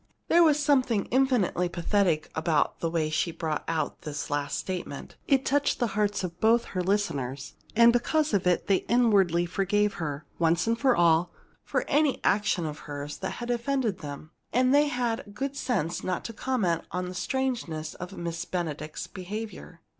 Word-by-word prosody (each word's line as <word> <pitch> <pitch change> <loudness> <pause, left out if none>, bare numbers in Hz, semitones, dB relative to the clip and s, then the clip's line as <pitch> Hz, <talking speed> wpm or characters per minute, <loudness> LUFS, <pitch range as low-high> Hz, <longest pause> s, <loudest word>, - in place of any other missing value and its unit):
There 340 - +6
was 305 -3 +5
something 255 -8 +2
infinitely 245 -9 +2
pathetic 175 -2 0
about 160 -1 +1
the 165 - -1
way 160 -2 0
she 170 +2 0
brought 160 -2 -3
out 160 -2 -2
this 150 0 -5
last 145 -1 -1
statement. 180 -6 -5
It 270 -1 +3
touched 285 +1 +2
the 240 - 0
hearts 205 -2 0
of 175 -1 -5
both 230 +2 +4
her 185 - 0
listeners, 145 -9 -1 0.2
and 235 +1 +7
because 305 +5 +1
of 190 -3 +2
it 180 - +2
they 195 - +3
inwardly 200 -8 +3
forgave 200 +3 +1
her, 145 -2 -4
once 170 +1 +2
and 230 - +2
for 260 +1 +3
all, 170 0 +4 0.3
for - - -1
any 295 -1 +2
action 205 -4 +2
of 150 -1 -5
hers 145 0 -5
that 190 - -3
had 240 0 -4
offended 240 -4 0
them. 150 0 -8 0.2
And 255 +2 +3
they 295 +1 +5
had 245 -4 -1
the - - -16
good 270 +7 -4
sense 200 - -1
not 185 -1 -2
to 230 - -5
comment 210 -9 0
on 180 +1 -3
the 180 - -6
strangeness 180 - -2
of 180 +2 -8
Miss 170 -1 -3
Benedict's 155 -4 -4
behavior. 190 -3 -7
185 Hz, 175 wpm, -27 LUFS, 165-240 Hz, 0.3 s, and